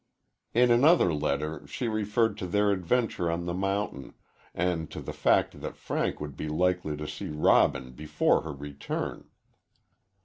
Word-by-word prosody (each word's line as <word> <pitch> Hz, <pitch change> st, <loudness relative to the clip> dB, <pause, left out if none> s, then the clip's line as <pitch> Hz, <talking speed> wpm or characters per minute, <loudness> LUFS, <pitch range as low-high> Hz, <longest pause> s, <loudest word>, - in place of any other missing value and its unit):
In 120 Hz, +1 st, +5 dB
another 125 Hz, -, +5 dB
letter 75 Hz, 0 st, -2 dB
she 120 Hz, -, -3 dB
referred 110 Hz, +1 st, +1 dB
to 90 Hz, -, -3 dB
their 105 Hz, +3 st, +2 dB
adventure 95 Hz, -1 st, 0 dB
on 85 Hz, +1 st, -2 dB
the 85 Hz, -, -2 dB
mountain, 95 Hz, -5 st, -2 dB, 0.4 s
and 90 Hz, -2 st, -1 dB
to -, -, -7 dB
the -, -, -6 dB
fact -, -, +2 dB
that -, -, -6 dB
Frank -, -, -2 dB
would 75 Hz, -2 st, -6 dB
be 75 Hz, -, -5 dB
likely 90 Hz, -1 st, 0 dB
to 75 Hz, 0 st, -5 dB
see -, -, -6 dB
Robin 75 Hz, -4 st, +3 dB
before 75 Hz, +3 st, +1 dB
her 80 Hz, -, -6 dB
return. 70 Hz, 0 st, -5 dB
85 Hz, 150 wpm, -28 LUFS, 75-105 Hz, 0.4 s, In